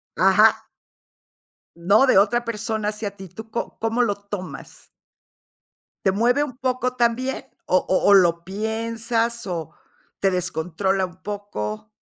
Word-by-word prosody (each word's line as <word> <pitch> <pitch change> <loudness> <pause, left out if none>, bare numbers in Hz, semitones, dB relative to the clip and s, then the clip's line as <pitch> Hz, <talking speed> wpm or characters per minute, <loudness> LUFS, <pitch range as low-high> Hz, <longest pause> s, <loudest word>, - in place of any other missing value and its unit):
Ajá. - - +4 1.1
No, 200 +10 +4
de 255 - +5
otra 240 +5 +3
persona 220 -1 -2
hacia 210 -1 -4
ti, 190 -1 -10
¿tú 220 +5 -10
co 235 - -4
cómo 225 +2 0
lo 205 -4 +1
tomas? 200 -2 -9 1.1
¿Te 190 - +4
mueve 245 +8 +2
un 255 -4 -6
poco 255 -1 -1
también, 250 +3 0 0.2
o 185 - +3
o 190 +2 +2
o - - +8
lo 170 -3 +4
piensas, 230 +3 -2
o 165 -4 -4 0.5
te 195 -1 +2
descontrola 180 +2 -1
un 180 0 -12
poco? 110 - -5
210 Hz, 135 wpm, -23 LUFS, 185-235 Hz, 1.1 s, o